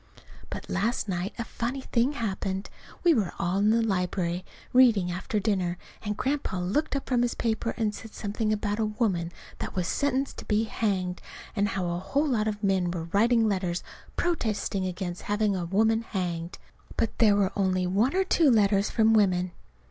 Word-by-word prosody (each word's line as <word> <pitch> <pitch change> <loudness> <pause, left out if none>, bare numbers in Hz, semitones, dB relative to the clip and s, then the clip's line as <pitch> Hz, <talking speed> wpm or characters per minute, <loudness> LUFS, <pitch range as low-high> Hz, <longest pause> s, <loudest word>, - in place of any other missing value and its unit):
But - - -6
last 215 +4 0
night 185 0 -2
a 235 - -2
funny 235 +4 -3
thing 250 +2 +1
happened. 195 -5 -3 0.3
We 345 -2 +6
were 210 - 0
all 180 +3 0
in 205 +1 +4
the 230 +1 +3
library 180 -3 -1 0.3
reading 225 -8 +5
after 185 +4 -2
dinner, 190 -4 0 0.2
and 210 -1 -3
Grandpa 270 -8 -1
looked 205 - 0
up 275 - -2
from 245 -2 +2
his 245 -1 0
paper 230 0 -1
and 215 -3 0
said 225 0 -10
something 215 +1 -1
about 210 0 -1
a 220 - +2
woman 205 -6 0 0.3
that - - -5
was 180 -2 0
sentenced 275 +2 0
to - - -8
be 215 +1 +2
hanged 190 -5 -1 0.3
and 205 -1 +2
how 190 -3 -2
a 175 - -2
whole 285 +11 0
lot 220 -4 +1
of 210 -1 -3
men 190 -3 +2
were 170 -1 -4
writing 230 +2 +4
letters 185 -3 -1 0.3
protesting 215 - -1
against 180 -1 -4
having 205 -1 +1
a 180 -2 -2
woman 220 +5 +2
hanged; 175 -5 -3 0.4
but 230 - -1
there 215 -3 +6
were 200 -1 +2
only 185 -2 +1
one 205 - +2
or 385 - +4
two 335 -5 +4
letters 205 -3 +3
from 225 -1 +4
women. 185 -4 +3
205 Hz, 185 wpm, -27 LUFS, 185-230 Hz, 0.4 s, We